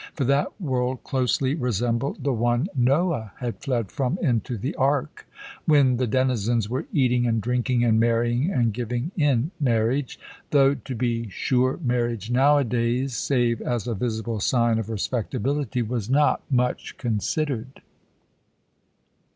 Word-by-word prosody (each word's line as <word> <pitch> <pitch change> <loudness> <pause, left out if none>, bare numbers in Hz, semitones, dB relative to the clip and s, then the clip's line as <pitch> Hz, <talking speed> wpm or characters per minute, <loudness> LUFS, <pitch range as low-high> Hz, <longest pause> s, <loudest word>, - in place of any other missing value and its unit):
For 140 - -1
that 140 - 0
world 130 -6 -2
closely 130 0 0
resembled 125 - -1
the 140 - +1
one 120 - +1
Noah 135 - +1
had 120 -3 -4
fled 120 -8 -2
from 140 +4 -1
into 120 - 0
the 130 +8 -3
ark, 135 0 -1 0.4
when 140 -5 +4
the 125 0 0
denizens 120 -3 +1
"were 130 +7 -3
eating 125 -4 +2
and 115 -1 +1
drinking 125 +1 0
and 110 -2 +3
marrying 120 +5 +2
and 120 - +1
giving 120 - -3
in 145 -2 +1
marriage" 125 0 0 0.3
though, 140 -1 +4
to 135 -2 -7
be 115 -1 -1
sure, 130 +6 0
marriage 120 -3 -1
nowadays, 125 -2 +2
save 120 -2 +1
as 120 -3 -2
a 120 - -1
visible 110 0 -3
sign 115 +1 +2
of 110 -1 -5
respectability, 125 +3 -2
was 115 -1 -3
not 145 +3 +3
much 125 -2 -1
considered. 125 +2 -2
125 Hz, 135 wpm, -24 LUFS, 115-135 Hz, 0.4 s, when